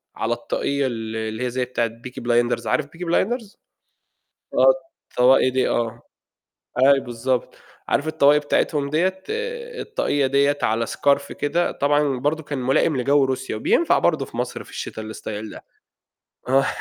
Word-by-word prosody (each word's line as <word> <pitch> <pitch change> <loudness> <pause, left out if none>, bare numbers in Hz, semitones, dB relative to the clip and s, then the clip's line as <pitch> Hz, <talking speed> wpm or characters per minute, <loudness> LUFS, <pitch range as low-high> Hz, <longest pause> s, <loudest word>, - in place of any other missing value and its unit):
على - - -1
الطاقية 140 -1 -1
ال 115 -2 -5
اللي 110 +2 -3
هي - - 0
زي 125 +1 -1
بتاعة 120 -2 -1
Peaky 120 +2 -10
blinders 120 -1 +1
عارف 155 - +1
Peaky 165 +4 -8
blinders؟ 220 +4 0 1.0
آه، - - +6 0.4
الطواقي 130 +1 +5
دي 130 0 +1
آه، 115 0 -1 0.8
أيوه 140 0 +6
بالضبط، 120 +1 -2 0.3
عارف 155 - +1
الطواقي 145 -1 +5
بتاعتهم 145 -1 0
دِيَّة 185 +4 0 0.6
الطاقية 145 - 0
دِيَّة 140 +2 +2
على 115 -1 +1
scarf 140 0 +1
كده 170 +4 0
طبعًا 145 -2 +1
برضه 150 +4 -1
كان 145 -2 -5
ملائم 135 +4 +2
لجَوّ 140 +2 +3
روسيا، 130 -3 -2
وبينفع 325 - +3
برضه 155 -5 +1
في - - -12
مصر 125 0 -3
في - - -16
الشتا 110 - -6
الstyle 110 0 -6
ده - - -11 0.8
آه 135 +1 +4
135 Hz, 150 wpm, -22 LUFS, 120-145 Hz, 1.0 s, آه